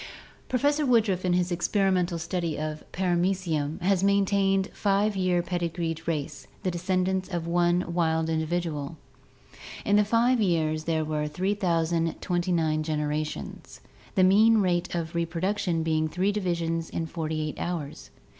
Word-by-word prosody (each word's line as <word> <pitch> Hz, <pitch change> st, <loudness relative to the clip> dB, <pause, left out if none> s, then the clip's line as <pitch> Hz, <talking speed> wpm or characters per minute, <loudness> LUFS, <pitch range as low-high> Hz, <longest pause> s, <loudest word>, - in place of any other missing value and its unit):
Professor 290 Hz, +4 st, +2 dB
Woodruff 220 Hz, -8 st, +2 dB
in 180 Hz, -, +2 dB
his 180 Hz, 0 st, +1 dB
experimental 180 Hz, 0 st, +1 dB
study 170 Hz, -1 st, -2 dB
of 155 Hz, 0 st, -4 dB
Paramecium 175 Hz, -4 st, 0 dB
has 190 Hz, +1 st, +2 dB
maintained 195 Hz, -1 st, +2 dB
a -, -, -12 dB
five 200 Hz, +1 st, +1 dB
year 180 Hz, -2 st, +1 dB
pedigreed 170 Hz, -2 st, -3 dB
race, 150 Hz, -4 st, -3 dB, 0.2 s
the 185 Hz, -, 0 dB
descendants 185 Hz, +2 st, -1 dB
of 175 Hz, -3 st, -3 dB
one 175 Hz, +1 st, +2 dB
wild 160 Hz, -2 st, +1 dB
individual. 160 Hz, -2 st, -2 dB, 0.9 s
In 205 Hz, -, +4 dB
the 210 Hz, -, +5 dB
five 235 Hz, +3 st, +2 dB
years 155 Hz, -5 st, +1 dB
there 160 Hz, -1 st, 0 dB
were 150 Hz, -1 st, -1 dB
3029 170 Hz, -2 st, 0 dB
generations, 150 Hz, 0 st, -4 dB, 0.4 s
the 190 Hz, -, +4 dB
mean 215 Hz, +4 st, +6 dB
rate 180 Hz, -4 st, 0 dB
of 165 Hz, -1 st, -3 dB
reproduction 170 Hz, +1 st, -1 dB
being 155 Hz, -1 st, +1 dB
three 185 Hz, +5 st, 0 dB
divisions 170 Hz, -5 st, -2 dB
in 165 Hz, -, -3 dB
forty 160 Hz, -1 st, -3 dB
eight -, -, -8 dB
hours. 160 Hz, -5 st, -4 dB
175 Hz, 135 wpm, -27 LUFS, 160-190 Hz, 0.9 s, mean